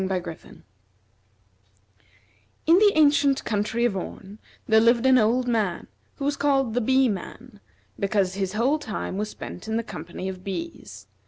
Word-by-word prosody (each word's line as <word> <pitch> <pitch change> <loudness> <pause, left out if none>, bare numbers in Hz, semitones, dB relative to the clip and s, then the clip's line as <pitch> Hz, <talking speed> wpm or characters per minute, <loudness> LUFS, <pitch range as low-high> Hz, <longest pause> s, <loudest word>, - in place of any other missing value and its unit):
In 190 - -2 2.6
the 380 +6 +6
ancient 285 -2 +3
country 220 +2 0
of 225 -5 0
Orn, 195 +2 -7 0.3
there 220 0 +5
lived 235 +2 +3
an 260 -1 +6
old 245 +3 +2
man 220 -7 -1 0.3
who 275 - -5
was 290 0 0
called 270 -5 +1
the 245 - +1
Bee 260 +3 +3
man, 215 +2 -6 0.4
because 195 -2 0
his 190 0 -3
whole 260 +8 +1
time 215 -7 -5
was 210 0 -2
spent 180 - -9
in 220 0 -1
the 230 - -1
company 175 -1 -7
of 185 -1 -6
bees. 170 - -7
220 Hz, 150 wpm, -24 LUFS, 195-260 Hz, 2.6 s, the